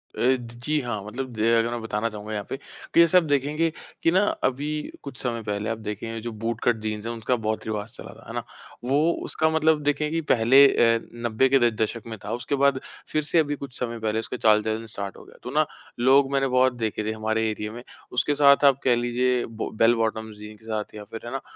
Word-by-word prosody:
अ, -, -, -8 dB
ज 120 Hz, -2 st, +1 dB
जी। 150 Hz, +1 st, +1 dB
हाँ, 110 Hz, -5 st, -4 dB
मतलब 130 Hz, +5 st, -5 dB
दे 110 Hz, +1 st, +1 dB
अगर 115 Hz, +1 st, +2 dB
मैं 120 Hz, -1 st, -3 dB
बताना 110 Hz, +1 st, -2 dB
चाहूँगा 105 Hz, 0 st, -7 dB
यहाँ 105 Hz, -1 st, -3 dB
पे 135 Hz, -, -3 dB
कि 165 Hz, -, -3 dB
जिसे 170 Hz, +2 st, +6 dB
आप 175 Hz, -, +5 dB
देखेंगे 150 Hz, +3 st, +1 dB, 0.3 s
कि 165 Hz, -, +4 dB
ना 190 Hz, +3 st, +4 dB, 0.2 s
अभी 135 Hz, +3 st, 0 dB, 0.4 s
कुछ 140 Hz, -3 st, -8 dB
समय 115 Hz, -2 st, -2 dB
पहले 105 Hz, 0 st, -3 dB
आप 115 Hz, -, -2 dB
देखेंगे 115 Hz, +2 st, -4 dB
जो 120 Hz, 0 st, -5 dB
बूट 115 Hz, +1 st, -3 dB
कट 120 Hz, -, +3 dB
जीन्स 105 Hz, 0 st, -3 dB
हैं 120 Hz, -, -2 dB
उसका 115 Hz, +2 st, 0 dB
बहुत 110 Hz, 0 st, -1 dB
रिवाज़ 105 Hz, 0 st, -4 dB
चला -, -, -10 dB
था -, -, -17 dB
है -, -, -7 dB
ना -, -, -3 dB, 0.5 s
वो 140 Hz, +2 st, +3 dB, 0.3 s
उसका 160 Hz, 0 st, +1 dB
मतलब 160 Hz, -1 st, +2 dB
देखें 145 Hz, +1 st, 0 dB
कि 165 Hz, 0 st, 0 dB
पहले 130 Hz, +4 st, +6 dB
अ, 115 Hz, -3 st, +3 dB, 0.2 s
90 120 Hz, +3 st, +2 dB
के 135 Hz, 0 st, +5 dB
द 120 Hz, -2 st, +3 dB
दशक 115 Hz, +1 st, -1 dB
में 110 Hz, -1 st, -6 dB
था -, -, -4 dB
उसके 125 Hz, +4 st, -2 dB
बाद 140 Hz, -1 st, +3 dB, 0.3 s
फ़िर 155 Hz, -1 st, 0 dB
से 165 Hz, +2 st, +2 dB
अभी 145 Hz, -2 st, +1 dB
कुछ 135 Hz, -3 st, -7 dB
समय 115 Hz, -2 st, -3 dB
पहले 110 Hz, 0 st, -1 dB
इसका 125 Hz, +2 st, -5 dB
चाल-चलन 110 Hz, +1 st, +2 dB
स्टार्ट 100 Hz, -2 st, -6 dB
हो -, -, -12 dB
गया -, -, -17 dB
तो 125 Hz, -, -6 dB
ना 155 Hz, 0 st, +4 dB, 0.3 s
लोग 135 Hz, +2 st, +4 dB
मैंने 135 Hz, -1 st, +2 dB
बहुत 130 Hz, 0 st, +3 dB
देखे 110 Hz, -2 st, -2 dB
थे -, -, 0 dB
हमारे 110 Hz, 0 st, -1 dB
एरिये 105 Hz, 0 st, -4 dB
में 120 Hz, +2 st, -9 dB, 0.3 s
उसके 135 Hz, +4 st, +1 dB
साथ 140 Hz, 0 st, +5 dB
आप 135 Hz, -1 st, +5 dB
कह 125 Hz, -2 st, +4 dB
लीजिए 120 Hz, +1 st, +1 dB
बो 115 Hz, 0 st, -5 dB
बेल 115 Hz, +1 st, +6 dB
बॉटम्स 110 Hz, -1 st, -2 dB
जीन्स 105 Hz, 0 st, -11 dB
के 110 Hz, -, -20 dB
साथ 110 Hz, -1 st, -4 dB
या 105 Hz, -, -7 dB
फ़िर 110 Hz, +2 st, -9 dB
है 120 Hz, -, -6 dB
ना 135 Hz, 0 st, -3 dB
120 Hz, 240 wpm, -25 LUFS, 110-135 Hz, 0.5 s, जिसे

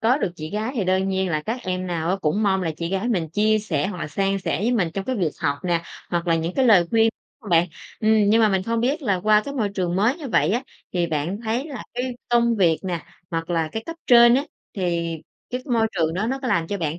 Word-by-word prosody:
Có 240 Hz, +5 st, +3 dB
được 180 Hz, -, -1 dB
chị 155 Hz, 0 st, -6 dB
gái 215 Hz, +4 st, -2 dB
thì 220 Hz, -7 st, 0 dB
đơn 190 Hz, +1 st, +1 dB
nhiên 190 Hz, -1 st, 0 dB
là 155 Hz, -2 st, -1 dB
các 230 Hz, +9 st, -3 dB
em 185 Hz, -1 st, -3 dB
nào 170 Hz, -1 st, -1 dB
á 190 Hz, -, +1 dB
cũng 160 Hz, +8 st, +1 dB
mong 190 Hz, -2 st, +2 dB
là 165 Hz, -, -1 dB
chị 170 Hz, 0 st, -3 dB
gái 195 Hz, +5 st, -1 dB
mình 180 Hz, -9 st, 0 dB
chia 215 Hz, +4 st, +2 dB
sẻ, 165 Hz, -9 st, -1 dB
hoặc 200 Hz, -, -6 dB
là 155 Hz, -, -4 dB
san 195 Hz, +5 st, 0 dB
sẻ 185 Hz, -3 st, -2 dB
với 225 Hz, +6 st, +1 dB
mình 195 Hz, -8 st, +1 dB
trong 195 Hz, -, -3 dB
việc 170 Hz, -5 st, +1 dB
học 140 Hz, -3 st, 0 dB
nè 170 Hz, -2 st, +1 dB, 0.3 s
hoặc 175 Hz, 0 st, -1 dB
là 165 Hz, -, +3 dB
những 165 Hz, +2 st, -2 dB
cái 265 Hz, -, +3 dB
lời 190 Hz, -7 st, +6 dB
khuyên 225 Hz, 0 st, +4 dB, 0.3 s
hông 215 Hz, -6 st, -9 dB
bạn? 170 Hz, +1 st, +4 dB, 0.3 s
Ừm, 215 Hz, -1 st, +4 dB
nhưng 225 Hz, +2 st, +5 dB
mà 215 Hz, -, +5 dB
mình 190 Hz, -2 st, +1 dB
không 230 Hz, +3 st, -1 dB
biết 275 Hz, +7 st, 0 dB
là 200 Hz, -8 st, 0 dB
qua 215 Hz, 0 st, +4 dB
cái 280 Hz, -, -5 dB
môi 220 Hz, -7 st, 0 dB
trường 180 Hz, -2 st, -1 dB
mới 220 Hz, +8 st, +2 dB
như 305 Hz, -5 st, -7 dB
vậy 225 Hz, -, +2 dB
á, 240 Hz, +4 st, 0 dB, 0.3 s
thì 175 Hz, -2 st, +1 dB
bạn 160 Hz, +5 st, -2 dB
thấy 235 Hz, +6 st, -1 dB
là 280 Hz, -5 st, -7 dB
cái 250 Hz, 0 st, -3 dB
công 235 Hz, -1 st, +3 dB
việc 170 Hz, -5 st, +3 dB
nè, 175 Hz, -4 st, -3 dB, 0.3 s
hoặc 165 Hz, 0 st, -3 dB
là 165 Hz, -2 st, 0 dB
cái 220 Hz, -, -3 dB
cấp 330 Hz, -, -6 dB
trên 240 Hz, -1 st, +7 dB
á, 275 Hz, +3 st, +2 dB, 0.3 s
thì 170 Hz, -3 st, -1 dB, 0.3 s
cái 250 Hz, +1 st, -3 dB
môi 225 Hz, -1 st, +3 dB
trường 160 Hz, -1 st, 0 dB
đó 195 Hz, +5 st, -1 dB
nó 265 Hz, +3 st, -1 dB
có 255 Hz, -, -2 dB
làm 165 Hz, -6 st, +1 dB
cho 200 Hz, -, -2 dB
bạn 160 Hz, -1 st, -2 dB
195 Hz, 270 wpm, -23 LUFS, 170-230 Hz, 0.3 s, trên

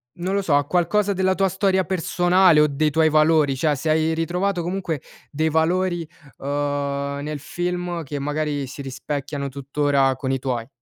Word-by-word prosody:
non 185 Hz, +3 st, -2 dB
lo 200 Hz, -, +1 dB
so, 155 Hz, -6 st, +1 dB
a 145 Hz, -, +2 dB
qualcosa 180 Hz, +5 st, +1 dB
della 190 Hz, 0 st, +1 dB
tua 195 Hz, 0 st, +2 dB
storia 190 Hz, 0 st, +1 dB
personale 180 Hz, -1 st, +3 dB
o 150 Hz, -, +5 dB
dei 150 Hz, +2 st, 0 dB
tuoi 160 Hz, +1 st, +3 dB
valori, 155 Hz, -2 st, +3 dB
cioè, 150 Hz, +2 st, +1 dB
se 155 Hz, +4 st, -3 dB
hai 160 Hz, +1 st, +2 dB
ritrovato 175 Hz, +3 st, -1 dB
comunque 175 Hz, -4 st, -3 dB, 0.3 s
dei 155 Hz, +2 st, 0 dB
valori, 175 Hz, +2 st, +1 dB, 0.3 s
uhm, 140 Hz, 0 st, -2 dB
nel 150 Hz, 0 st, -4 dB
film 175 Hz, +2 st, -3 dB
che 145 Hz, 0 st, -5 dB
magari 145 Hz, -1 st, -2 dB
si 135 Hz, +2 st, -8 dB
rispecchiano, 140 Hz, +1 st, -4 dB
tuttora, 140 Hz, 0 st, +1 dB
con 130 Hz, 0 st, -2 dB
i 135 Hz, -, +1 dB
tuoi. 125 Hz, -3 st, -3 dB
155 Hz, 170 wpm, -22 LUFS, 140-175 Hz, 0.3 s, o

